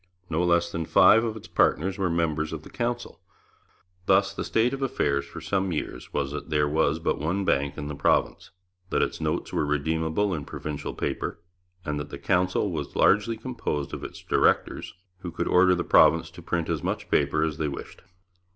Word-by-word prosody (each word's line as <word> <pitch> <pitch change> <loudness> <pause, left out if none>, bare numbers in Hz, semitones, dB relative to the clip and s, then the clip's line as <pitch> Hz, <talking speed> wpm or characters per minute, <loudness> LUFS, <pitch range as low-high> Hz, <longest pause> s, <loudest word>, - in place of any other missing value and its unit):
No 80 +3 +1
less 85 -1 +2
than 80 -1 -3
five 115 - +6
of 110 -2 -3
its 110 - -11
partners 95 +5 +1
were 95 -2 +1
members 80 -2 0
of 80 -1 -6
the - - -13
Council. 120 -1 -3 0.9
Thus - - +4
the - - -4
state 120 +3 +1
of 135 - -4
affairs 70 - 0
for 75 +3 -9
some 95 +3 -1
years 60 -6 -5
was 70 -1 -2
that 75 +2 -6
there 75 -1 +2
was 75 0 +1
but 80 - -1
one 90 +7 -1
bank 70 -3 0
in 75 -1 -4
the 75 - -4
province, 70 - +1 0.4
that - - +2
its - - -3
notes - - -2
were - - +1
redeemable 80 +6 0
in 75 -4 -3
provincial 75 +1 -6
paper, - - -3 0.5
and 75 -1 -2
that 75 0 -6
the - - -7
Council 90 0 +1
was - - -5
largely 110 +3 +3
composed 110 - -4
of - - -5
its - - -8
directors, - - +1 0.2
who 90 - -6
could 85 +1 -3
order 90 0 +5
the 85 - -2
province 80 -1 +4
to 85 +1 -12
print 85 -1 -2
as - - -1
much - - -3
paper 75 - +2
as 80 -1 -2
they 75 - 0
wished! 70 - -7
80 Hz, 195 wpm, -26 LUFS, 75-95 Hz, 0.9 s, five